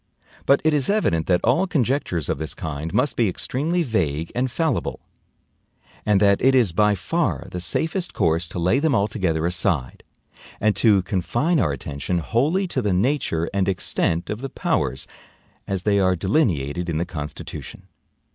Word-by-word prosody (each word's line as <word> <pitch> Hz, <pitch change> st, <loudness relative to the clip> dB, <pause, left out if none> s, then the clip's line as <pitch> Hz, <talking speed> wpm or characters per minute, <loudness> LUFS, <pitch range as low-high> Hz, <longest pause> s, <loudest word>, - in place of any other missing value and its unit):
But 140 Hz, -, +5 dB
it 155 Hz, 0 st, +3 dB
is 145 Hz, -3 st, +2 dB
evident 85 Hz, -, +1 dB
that 90 Hz, -1 st, +2 dB
all 125 Hz, +11 st, +2 dB
conjectures 130 Hz, -, 0 dB
of -, -, -2 dB
this 80 Hz, 0 st, -4 dB
kind 80 Hz, 0 st, -5 dB
must 145 Hz, -, +1 dB
be 115 Hz, -4 st, +2 dB
extremely 155 Hz, -, -1 dB
vague 85 Hz, -, -1 dB
and 130 Hz, +2 st, 0 dB
fallible: 155 Hz, +6 st, -1 dB, 1.1 s
and 105 Hz, -2 st, +4 dB
that 100 Hz, -1 st, +3 dB
it 135 Hz, +1 st, +4 dB
is 120 Hz, -8 st, +3 dB
by 105 Hz, +3 st, +3 dB
far 155 Hz, -, -1 dB
the 90 Hz, -, -4 dB
safest 165 Hz, -, -1 dB
course 85 Hz, -2 st, +1 dB
to -, -, -8 dB
lay 90 Hz, +9 st, +2 dB
them 150 Hz, -3 st, +2 dB
altogether 95 Hz, -7 st, 0 dB
aside, 85 Hz, -7 st, -1 dB, 0.6 s
and 105 Hz, 0 st, +2 dB
to 100 Hz, -5 st, +4 dB
confine 120 Hz, -, 0 dB
our 75 Hz, -, +2 dB
attention 70 Hz, +5 st, -3 dB
wholly 145 Hz, -, +1 dB
to 130 Hz, -, -1 dB
the 105 Hz, -4 st, 0 dB
nature 95 Hz, -, 0 dB
and 100 Hz, -1 st, +1 dB
extent 85 Hz, -2 st, -1 dB
of 105 Hz, +3 st, -4 dB
the 135 Hz, -, -4 dB
powers 65 Hz, -, -1 dB, 0.6 s
as 95 Hz, -2 st, -2 dB
they 100 Hz, -1 st, +2 dB
are 95 Hz, -1 st, +3 dB
delineated 90 Hz, -, 0 dB
in 80 Hz, -, -1 dB
the 85 Hz, -, 0 dB
Constitution. 75 Hz, -4 st, -7 dB
100 Hz, 165 wpm, -22 LUFS, 85-130 Hz, 1.1 s, But